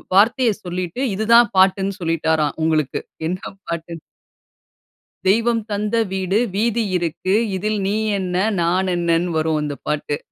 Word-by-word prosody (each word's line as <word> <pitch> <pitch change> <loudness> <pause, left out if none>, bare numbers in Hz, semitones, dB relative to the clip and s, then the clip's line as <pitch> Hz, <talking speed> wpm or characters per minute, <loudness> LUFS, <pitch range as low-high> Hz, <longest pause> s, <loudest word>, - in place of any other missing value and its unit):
வார்த்தைய 235 +4 +4
சொல்லிட்டு, 180 +5 -4
இது 215 - -2
தான் 235 -2 +7
பாட்டுன்னு 190 +1 +3
சொல்லிட்டாராம் 160 -3 0
உங்களுக்கு, 155 -3 +1 0.3
என்ன 180 +2 -2 0.3
பாட்டுன்னு. 170 0 -5 1.3
தெய்வம் 230 +3 +3
தந்த 210 +2 -1 0.2
வீடு, 190 +1 0 0.2
வீதி 230 +2 +1
இருக்கு. 175 +2 -2 0.2
இதில் 210 +2 -1
நீ 205 - 0 0.2
என்ன? 180 -1 -3 0.3
நான் 185 +2 +1
என்னன்னு 170 0 0
வரும் 155 -1 +1
அந்தப் 145 -1 -5
பாட்டு. 150 -1 -1
185 Hz, 130 wpm, -20 LUFS, 165-205 Hz, 1.3 s, தான்